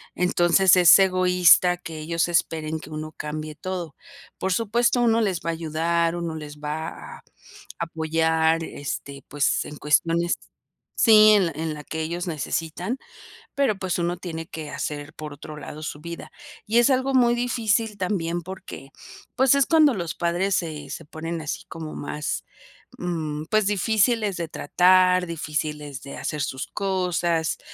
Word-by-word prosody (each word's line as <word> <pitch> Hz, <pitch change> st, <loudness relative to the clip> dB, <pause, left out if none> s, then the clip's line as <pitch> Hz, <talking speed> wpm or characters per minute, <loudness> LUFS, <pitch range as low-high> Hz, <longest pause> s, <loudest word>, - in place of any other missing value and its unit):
Entonces, 180 Hz, +1 st, +4 dB
es 175 Hz, -3 st, +9 dB
egoísta 180 Hz, -1 st, +5 dB
que 165 Hz, -3 st, -8 dB
ellos 165 Hz, +2 st, 0 dB
esperen 160 Hz, -2 st, -1 dB
que 155 Hz, -, -11 dB
uno 155 Hz, 0 st, -6 dB
cambie 155 Hz, 0 st, -5 dB
todo. 180 Hz, -3 st, -5 dB, 0.4 s
Por 190 Hz, -, -1 dB
supuesto, 235 Hz, +4 st, +2 dB
uno 230 Hz, -1 st, +3 dB
les 190 Hz, -6 st, 0 dB
va -, -, 0 dB
a -, -, -3 dB
ayudar, 165 Hz, +1 st, 0 dB
uno 170 Hz, -2 st, -4 dB
les 150 Hz, -1 st, -8 dB
va 150 Hz, +2 st, -4 dB, 0.3 s
a -, -, -20 dB, 0.6 s
apoyar, 160 Hz, 0 st, +1 dB
este, 140 Hz, -2 st, -6 dB
pues, 145 Hz, 0 st, +1 dB
en 150 Hz, -, -9 dB
cuestiones 165 Hz, +3 st, +1 dB, 0.6 s
Sí, 215 Hz, -2 st, +7 dB
en 200 Hz, -3 st, +4 dB
la 165 Hz, -, -3 dB
en 160 Hz, 0 st, -3 dB
la 150 Hz, -, -8 dB
que 160 Hz, -, -5 dB
ellos 175 Hz, +3 st, -3 dB
necesitan, 165 Hz, -, -3 dB, 0.6 s
pero, 275 Hz, -8 st, +1 dB
pues, 185 Hz, -2 st, -2 dB
uno 175 Hz, +1 st, -1 dB
tiene 165 Hz, -3 st, -6 dB
que 155 Hz, -3 st, -7 dB
hacer 145 Hz, 0 st, -5 dB
por 155 Hz, -1 st, -8 dB
otro 150 Hz, +2 st, -10 dB
lado 150 Hz, +1 st, -9 dB
su 150 Hz, -1 st, -6 dB
vida. 170 Hz, +1 st, -8 dB, 0.4 s
Y 225 Hz, +3 st, +3 dB
es 240 Hz, -, +4 dB
algo 265 Hz, 0 st, +1 dB
muy 240 Hz, -2 st, +4 dB
difícil 230 Hz, -3 st, 0 dB
también 175 Hz, -3 st, -1 dB
porque, 175 Hz, -6 st, -9 dB, 0.5 s
pues, 265 Hz, +1 st, +4 dB
es 280 Hz, -1 st, +4 dB
cuando 310 Hz, -4 st, +5 dB
los 170 Hz, -6 st, -4 dB
padres 175 Hz, +3 st, 0 dB
se 155 Hz, -5 st, -4 dB
se -, -, -7 dB
ponen 165 Hz, +2 st, -5 dB
así 155 Hz, -, -4 dB
como 160 Hz, -1 st, -7 dB
más, 150 Hz, +1 st, -4 dB, 0.5 s
mm, 155 Hz, -4 st, -3 dB
pues, 215 Hz, -1 st, +3 dB
difíciles 210 Hz, +1 st, +2 dB
de 170 Hz, -1 st, -3 dB
tratar, 185 Hz, +4 st, +4 dB
difíciles 150 Hz, -3 st, -4 dB
de 140 Hz, -, -9 dB
hacer 150 Hz, -, -3 dB
sus 130 Hz, 0 st, -3 dB
cosas, 180 Hz, -4 st, -1 dB
170 Hz, 160 wpm, -24 LUFS, 155-190 Hz, 0.6 s, es